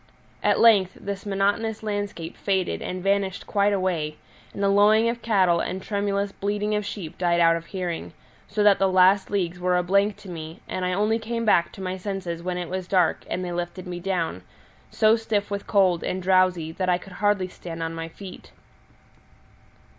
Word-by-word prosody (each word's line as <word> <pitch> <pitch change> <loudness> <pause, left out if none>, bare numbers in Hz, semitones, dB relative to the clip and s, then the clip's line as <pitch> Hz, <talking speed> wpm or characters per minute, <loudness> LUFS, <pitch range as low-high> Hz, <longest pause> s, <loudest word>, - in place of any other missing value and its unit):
At - - +2
length 200 -5 +5
this 200 0 -6
monotonous 205 +3 0
landscape 205 -6 -4
faded 190 -3 -1
and 185 0 -5
vanished 195 -1 0
quite 205 0 +2
away, 175 -6 -1 0.3
and 200 - -4
the - - +4
lowing 210 +3 +5
of 235 0 -4
cattle 185 -6 +3
and 185 +2 -3
tremulous 200 0 -1
bleating 205 +1 -2
of 210 0 0
sheep 190 -6 -7
died 175 -1 +2
out 165 -1 +5
of 165 0 -6
hearing, 180 -4 -4 0.3
so 210 +1 0
that 205 -1 +5
the 195 - +3
last 185 +1 +4
leagues 180 -3 -1
were 180 0 +1
a 180 - +1
blank 200 +3 +2
to 210 - -14
me, 165 -1 -7
and 185 - -3
I 180 - 0
only 210 +4 +1
came 230 +1 -3
back 170 -5 +3
to 190 - -8
my 185 0 -3
senses 185 -3 -4
when 180 +1 -3
it 175 -1 -4
was 185 -1 -4
dark 180 -4 +2
and 180 - -2
they 175 - -4
lifted 175 +1 -4
me 175 -1 -5
down, 175 - -2 0.5
so 215 0 +4
stiff 210 -3 -2
with 200 0 -4
cold 185 -4 +3
and 185 - -2
drowsy 185 -3 +2
that 185 +2 -2
I 175 - +3
could 185 +1 -13
hardly 205 0 +1
stand 165 -2 -7
on 165 0 -3
my 165 0 -5
feet. 185 +3 -11
190 Hz, 195 wpm, -24 LUFS, 180-205 Hz, 0.5 s, length